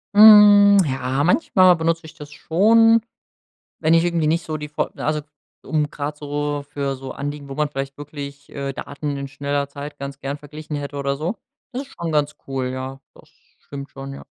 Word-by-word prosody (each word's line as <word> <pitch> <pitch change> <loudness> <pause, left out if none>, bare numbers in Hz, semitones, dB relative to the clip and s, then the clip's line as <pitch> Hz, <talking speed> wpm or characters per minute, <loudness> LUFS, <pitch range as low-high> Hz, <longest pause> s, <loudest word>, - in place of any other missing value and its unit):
Hm, 205 -1 +9
ja, 135 0 -1
manchmal 185 - +4
benutz 165 0 0
ich 160 - -12
das 150 0 -11
schon, 225 +9 +4 0.8
wenn 160 +1 +3
ich 165 - +4
irgendwie 170 -3 +1
nicht 165 +1 +1
so 155 -1 -3
die 150 0 -6
F 150 - -25
also 150 0 -1 0.4
um 150 -2 -1
grad 145 +1 -5
so 145 0 -3
für 140 -1 -2
so 130 0 -8
Anliegen, 145 0 -6
wo 135 - -6
man 150 0 0
vielleicht 135 -1 -5
wirklich, 140 -1 -9
äh, 140 0 -4
Daten 145 +1 -5
in 140 0 -5
schneller 140 +1 -2
Zeit 145 +1 -8
ganz 140 0 -7
gern 140 +1 -4
verglichen 150 +1 -8
hätte 145 0 -5
oder 140 0 -1
so. 165 +9 -3 0.4
Das 255 +1 -3
ist 280 - -13
schon 170 -1 -2
ganz 150 -1 0
cool, 135 -1 -2
ja. 130 +1 -6 0.2
Das - - -19 0.3
stimmt 140 0 -9
schon, 135 0 -8
ja. 135 - -11
145 Hz, 190 wpm, -21 LUFS, 140-160 Hz, 0.8 s, Hm